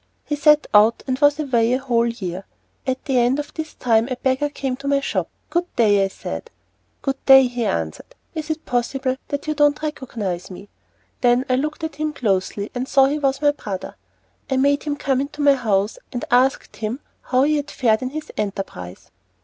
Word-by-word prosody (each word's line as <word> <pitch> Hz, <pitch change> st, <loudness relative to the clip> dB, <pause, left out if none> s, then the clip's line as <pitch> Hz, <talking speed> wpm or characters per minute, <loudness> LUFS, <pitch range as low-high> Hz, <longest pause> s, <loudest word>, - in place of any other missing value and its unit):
He 295 Hz, -, -1 dB
set 300 Hz, +1 st, +5 dB
out, 215 Hz, +2 st, +5 dB
and 260 Hz, -1 st, -2 dB
was 290 Hz, 0 st, +4 dB
away 245 Hz, -5 st, +2 dB
a -, -, +3 dB
whole 240 Hz, -3 st, +1 dB
year. 190 Hz, -5 st, -5 dB, 0.4 s
At 260 Hz, 0 st, -2 dB
the 265 Hz, -3 st, +2 dB
end 245 Hz, +3 st, +3 dB
of 295 Hz, -, -5 dB
this 315 Hz, -1 st, -6 dB
time 230 Hz, -1 st, +2 dB
a 255 Hz, -, -1 dB
beggar 265 Hz, +3 st, 0 dB
came 270 Hz, -3 st, -3 dB
to 280 Hz, +1 st, -7 dB
my 280 Hz, 0 st, +3 dB
shop. 275 Hz, -, -2 dB, 0.2 s
"Good 350 Hz, +1 st, -1 dB
day," 205 Hz, -4 st, +4 dB
I -, -, +2 dB
said. 80 Hz, -, -7 dB, 0.5 s
"Good 270 Hz, 0 st, -2 dB
day," 270 Hz, -1 st, +9 dB
he 245 Hz, -2 st, -2 dB
answered; 80 Hz, -, -3 dB, 0.2 s
"is 315 Hz, -2 st, -5 dB
it 315 Hz, 0 st, -3 dB
possible 255 Hz, +2 st, -1 dB
that 285 Hz, 0 st, -4 dB
you 305 Hz, -, 0 dB
do 295 Hz, 0 st, +4 dB
not 290 Hz, +2 st, -9 dB
recognise 220 Hz, -, -4 dB
me?" 195 Hz, +2 st, -10 dB, 0.5 s
Then 245 Hz, +1 st, +3 dB
I 255 Hz, -, +2 dB
looked 305 Hz, +4 st, -2 dB
at 315 Hz, -2 st, -4 dB
him 305 Hz, 0 st, -2 dB
closely 200 Hz, -4 st, -1 dB
and 250 Hz, +1 st, -3 dB
saw 270 Hz, -1 st, +5 dB
he 290 Hz, +3 st, 0 dB
was 275 Hz, 0 st, 0 dB
my 290 Hz, -, +5 dB
brother. 205 Hz, -10 st, -6 dB, 0.5 s
I 265 Hz, -, +1 dB
made 285 Hz, +2 st, +3 dB
him 295 Hz, -1 st, -1 dB
come 270 Hz, -2 st, 0 dB
into 280 Hz, +2 st, -6 dB
my 285 Hz, -1 st, +7 dB
house, 210 Hz, -5 st, 0 dB
and 245 Hz, -, -4 dB
asked 255 Hz, +2 st, +2 dB
him 225 Hz, +5 st, -3 dB, 0.2 s
how 255 Hz, +1 st, +2 dB
he 305 Hz, +1 st, +3 dB
had 290 Hz, 0 st, -3 dB
fared 225 Hz, -3 st, +1 dB
in 255 Hz, -, -2 dB
his 310 Hz, +3 st, -6 dB
enterprise. 195 Hz, -, -5 dB
260 Hz, 205 wpm, -21 LUFS, 225-290 Hz, 0.5 s, day